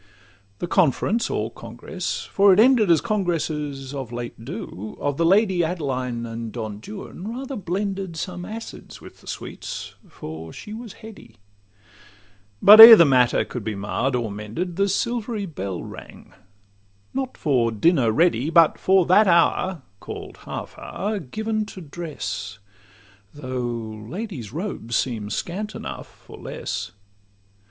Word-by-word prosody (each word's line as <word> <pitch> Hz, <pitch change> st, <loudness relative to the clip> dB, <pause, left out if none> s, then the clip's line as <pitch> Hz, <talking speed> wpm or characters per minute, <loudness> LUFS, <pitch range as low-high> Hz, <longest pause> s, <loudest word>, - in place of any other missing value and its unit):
The -, -, -3 dB
conference 190 Hz, -, +1 dB
or 110 Hz, +2 st, -2 dB
congress 120 Hz, -, -5 dB
(for 200 Hz, 0 st, +4 dB
it 190 Hz, -, +5 dB
ended 230 Hz, -4 st, +5 dB
As 165 Hz, -2 st, +5 dB
congresses 150 Hz, -8 st, -2 dB
of 135 Hz, -4 st, -6 dB
late 120 Hz, -1 st, -6 dB
do) 110 Hz, -2 st, -7 dB
of 145 Hz, -1 st, -2 dB
the 165 Hz, -, +2 dB
Lady 190 Hz, -2 st, +3 dB
Adeline 130 Hz, -8 st, -2 dB
and 115 Hz, -1 st, -6 dB
Don 110 Hz, -3 st, -6 dB
Juan 200 Hz, -, -8 dB
rather 265 Hz, +4 st, -5 dB
blended 195 Hz, -2 st, -3 dB
Some 180 Hz, +1 st, -5 dB
acids 225 Hz, +4 st, -9 dB
with -, -, -14 dB
the -, -, -19 dB
sweets—for 80 Hz, +1 st, -8 dB
she 210 Hz, -, -9 dB
was 225 Hz, -1 st, -8 dB
heady; 200 Hz, -, -13 dB, 1.3 s
But, 210 Hz, +2 st, +11 dB
ere 225 Hz, 0 st, +14 dB
the 170 Hz, -, +7 dB
matter 125 Hz, -4 st, +3 dB
could 125 Hz, -, -6 dB
be 110 Hz, 0 st, -3 dB
marr'd 115 Hz, +6 st, -1 dB
or 115 Hz, -4 st, -2 dB
mended, 110 Hz, -, -5 dB
The 200 Hz, +2 st, +2 dB
silvery 230 Hz, 0 st, -1 dB
bell 100 Hz, -, -5 dB
rang, -, -, -12 dB, 0.8 s
not 265 Hz, -1 st, -3 dB
for 125 Hz, -6 st, +1 dB
'dinner 125 Hz, -, +3 dB
ready, 150 Hz, 0 st, +2 dB
But 165 Hz, -1 st, +5 dB
for 190 Hz, -2 st, +4 dB
that 200 Hz, +4 st, +5 dB
hour, 170 Hz, -1 st, +2 dB, 0.2 s
call'd -, -, -8 dB
half -, -, -7 dB
hour, 205 Hz, +3 st, -3 dB
given 215 Hz, -, -3 dB
to 190 Hz, -, -10 dB
dress, 150 Hz, -, -6 dB, 0.8 s
Though 120 Hz, -5 st, -5 dB
ladies' 175 Hz, -, -6 dB
robes 155 Hz, -, -4 dB
seem 110 Hz, -5 st, -1 dB
scant 200 Hz, -, -4 dB
enough -, -, -7 dB
for -, -, -15 dB
less. -, -, -5 dB
165 Hz, 140 wpm, -23 LUFS, 120-200 Hz, 1.3 s, ere